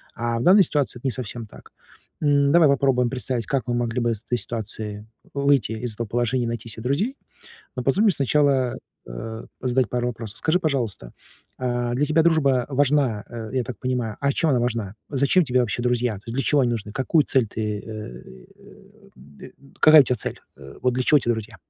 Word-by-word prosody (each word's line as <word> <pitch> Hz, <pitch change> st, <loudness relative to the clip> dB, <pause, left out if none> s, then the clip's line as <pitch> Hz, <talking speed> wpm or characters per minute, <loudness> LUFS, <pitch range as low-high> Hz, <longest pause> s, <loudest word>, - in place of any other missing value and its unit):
А 115 Hz, 0 st, -2 dB
в -, -, -2 dB
данной 195 Hz, +2 st, +7 dB
ситуации 145 Hz, -6 st, -1 dB
это 135 Hz, -, -3 dB
не -, -, +1 dB
совсем 120 Hz, -1 st, -5 dB
так. -, -, -16 dB, 0.5 s
М, 140 Hz, -2 st, +3 dB
давай 165 Hz, -4 st, +6 dB
попробуем 130 Hz, -3 st, +2 dB
представить, 125 Hz, -3 st, -3 dB
как 135 Hz, -3 st, -1 dB
мы 120 Hz, -, -1 dB
могли 120 Hz, 0 st, -1 dB
бы 120 Hz, -1 st, +1 dB
из 110 Hz, 0 st, -5 dB
этой 120 Hz, -, -1 dB
ситуации 105 Hz, -1 st, -4 dB, 0.3 s
выйти 140 Hz, -6 st, +2 dB
из 110 Hz, -1 st, -4 dB
этого 115 Hz, -1 st, -4 dB
положения, 120 Hz, +2 st, 0 dB
найти 115 Hz, -1 st, -5 dB
се 110 Hz, 0 st, -5 dB
друзей. 185 Hz, -, -1 dB, 0.6 s
Но 125 Hz, -, -3 dB
позволь 185 Hz, -, +2 dB
мне 210 Hz, -, +5 dB
сначала, 140 Hz, -4 st, +1 dB, 0.3 s
э, 110 Hz, -, -7 dB, 0.2 s
задать 125 Hz, -1 st, +1 dB
пару 125 Hz, 0 st, -1 dB
вопросов. 115 Hz, -2 st, -6 dB
Скажи, 170 Hz, +3 st, +1 dB
пожалуйста, 120 Hz, -, -2 dB, 0.4 s
а, 120 Hz, -1 st, -1 dB
для 140 Hz, +4 st, +1 dB
тебя 155 Hz, +2 st, +2 dB
дружба 140 Hz, -7 st, +3 dB
важна, 135 Hz, -6 st, +1 dB
э, 115 Hz, -2 st, -7 dB
я 130 Hz, -2 st, 0 dB
так 130 Hz, -, -8 dB
понимаю, 125 Hz, -4 st, -2 dB
а 140 Hz, 0 st, +1 dB
чем 165 Hz, -, +1 dB
она 125 Hz, -, +2 dB
важна? 115 Hz, -4 st, -2 dB
Зачем 140 Hz, +6 st, +3 dB
тебе 125 Hz, 0 st, +2 dB
вообще 120 Hz, 0 st, -2 dB
друзья? 125 Hz, -2 st, 0 dB
То 100 Hz, -, -12 dB
есть 115 Hz, -, -5 dB
для 135 Hz, -, 0 dB
чего 145 Hz, -2 st, +3 dB
они 120 Hz, -2 st, +1 dB
нужны, 105 Hz, -3 st, -4 dB
какую 135 Hz, +6 st, +2 dB
цель 130 Hz, -4 st, +2 dB
ты, 105 Hz, -1 st, -3 dB
э, 105 Hz, -, -8 dB
и, 65 Hz, -1 st, -14 dB
э, -, -, -20 dB
д 70 Hz, +3 st, -15 dB
э, -, -, -16 dB, 0.3 s
какая 155 Hz, -1 st, +8 dB
у -, -, +2 dB
тя 125 Hz, -1 st, 0 dB
цель? -, -, -4 dB, 0.2 s
Э, 70 Hz, 0 st, -12 dB
вот 125 Hz, -1 st, +1 dB
для 130 Hz, -, -1 dB
чего 150 Hz, +3 st, +5 dB
те 120 Hz, -, -4 dB
друзья? 110 Hz, -1 st, -5 dB
125 Hz, 215 wpm, -23 LUFS, 115-140 Hz, 0.6 s, какая